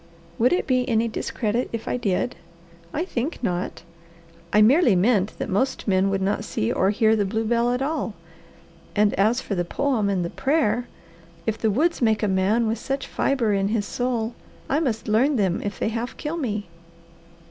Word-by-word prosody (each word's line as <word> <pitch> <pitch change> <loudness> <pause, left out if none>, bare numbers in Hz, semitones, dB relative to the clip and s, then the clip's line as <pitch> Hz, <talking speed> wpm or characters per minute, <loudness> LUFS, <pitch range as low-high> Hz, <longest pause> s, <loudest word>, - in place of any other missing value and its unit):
"Would 245 +3 +4
it 360 - +1
be 255 -1 +1
any 230 0 +2
discredit 225 +1 -2
if 230 -1 -5
I - - 0
did? 240 0 -1 0.6
I 330 - -2
think 290 -2 -3
not. 180 -4 -2 0.7
I 210 - +4
merely 240 - +5
meant 200 +1 +2
that - - -3
most 260 +8 -1
men 190 0 +3
would 195 -1 0
not 200 +1 0
see 110 - -1
or 190 - +2
hear 220 +1 +3
the 210 - +1
blue 220 +3 -1
bell 235 +2 +2
at 250 +2 0
all 280 -7 -2 0.8
and 210 0 +3
as 220 +5 +2
for - - -4
the 175 -2 0
poem 230 +1 0
and 180 -3 -2
prayer! 245 -5 +1 0.6
If 220 0 -1
the 220 - +2
woods 310 - +1
make 220 -2 +2
a - - +3
man 195 +5 +2
with 225 +1 -1
such 275 0 -3
fibre 240 -6 0
in 195 0 +1
his 210 -1 0
soul, 240 -1 -2 0.3
I 285 - +1
must 235 -9 -2
learn 245 +7 +3
them 195 -6 +1
if 205 -1 -4
they - - 0
half 230 +2 -4
kill 305 +2 -3
me." 215 -9 -2
225 Hz, 190 wpm, -24 LUFS, 205-250 Hz, 0.8 s, merely